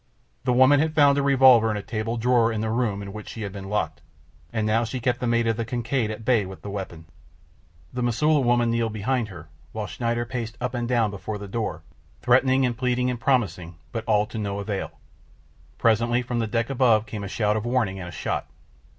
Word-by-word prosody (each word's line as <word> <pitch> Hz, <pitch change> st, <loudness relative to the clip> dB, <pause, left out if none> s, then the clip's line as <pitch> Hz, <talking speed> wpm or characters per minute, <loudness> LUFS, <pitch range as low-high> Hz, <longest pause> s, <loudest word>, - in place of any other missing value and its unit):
The -, -, +2 dB
woman 130 Hz, +3 st, +6 dB
had 160 Hz, +1 st, 0 dB
found 145 Hz, -2 st, +5 dB
a -, -, +2 dB
revolver 130 Hz, -5 st, +6 dB
in 105 Hz, -, -1 dB
a 100 Hz, -, -5 dB
table 115 Hz, +1 st, -3 dB
drawer 120 Hz, 0 st, +3 dB
in 110 Hz, -1 st, -2 dB
the 110 Hz, 0 st, -1 dB
room 110 Hz, -4 st, -1 dB
in 100 Hz, 0 st, -8 dB
which 105 Hz, -1 st, -8 dB
she 110 Hz, -, -6 dB
had 100 Hz, -, -4 dB
been 95 Hz, 0 st, -8 dB
locked, 105 Hz, 0 st, -2 dB, 0.5 s
and 110 Hz, -2 st, -1 dB
now 110 Hz, +2 st, +2 dB
she 120 Hz, +3 st, -4 dB
kept 120 Hz, +1 st, 0 dB
the 125 Hz, -, -2 dB
mate 115 Hz, 0 st, +2 dB
of 115 Hz, -1 st, 0 dB
the 115 Hz, -, -1 dB
Kincaid 120 Hz, 0 st, -1 dB
at 110 Hz, 0 st, -6 dB
bay 120 Hz, -4 st, +3 dB
with 95 Hz, 0 st, -10 dB
the 100 Hz, -, -6 dB
weapon. 95 Hz, -5 st, -6 dB, 0.9 s
The 125 Hz, -, -3 dB
Mosula 145 Hz, +6 st, +2 dB
woman 120 Hz, -1 st, +2 dB
kneeled 115 Hz, -1 st, 0 dB
behind 115 Hz, +2 st, -1 dB
her, 85 Hz, -5 st, -11 dB, 0.3 s
while 110 Hz, -1 st, -3 dB
Schneider 120 Hz, +6 st, -2 dB
paced 120 Hz, -2 st, -5 dB
up 125 Hz, 0 st, -3 dB
and 120 Hz, -1 st, -2 dB
down 115 Hz, -4 st, +1 dB
before 105 Hz, +2 st, -5 dB
the 100 Hz, 0 st, -8 dB
door, 110 Hz, +3 st, -3 dB, 0.4 s
threatening 130 Hz, +2 st, +3 dB
and 120 Hz, -1 st, -1 dB
pleading 125 Hz, +1 st, 0 dB
and 120 Hz, -, -5 dB
promising, 95 Hz, -11 st, 0 dB, 0.2 s
but 115 Hz, -2 st, -4 dB
all 105 Hz, -2 st, +3 dB
to 110 Hz, -, -7 dB
no 100 Hz, -1 st, -3 dB
avail. 100 Hz, -1 st, -4 dB, 0.8 s
Presently 115 Hz, +2 st, +2 dB
from 120 Hz, -1 st, -2 dB
the 115 Hz, -, 0 dB
deck 115 Hz, +3 st, -1 dB
above 120 Hz, -5 st, +3 dB
came 105 Hz, -2 st, -6 dB
a -, -, -4 dB
shout 105 Hz, +1 st, 0 dB
of 110 Hz, -, -1 dB
warning 115 Hz, -6 st, 0 dB
and 90 Hz, -, -6 dB
a -, -, -9 dB
shot. -, -, -3 dB
115 Hz, 225 wpm, -24 LUFS, 105-125 Hz, 0.9 s, woman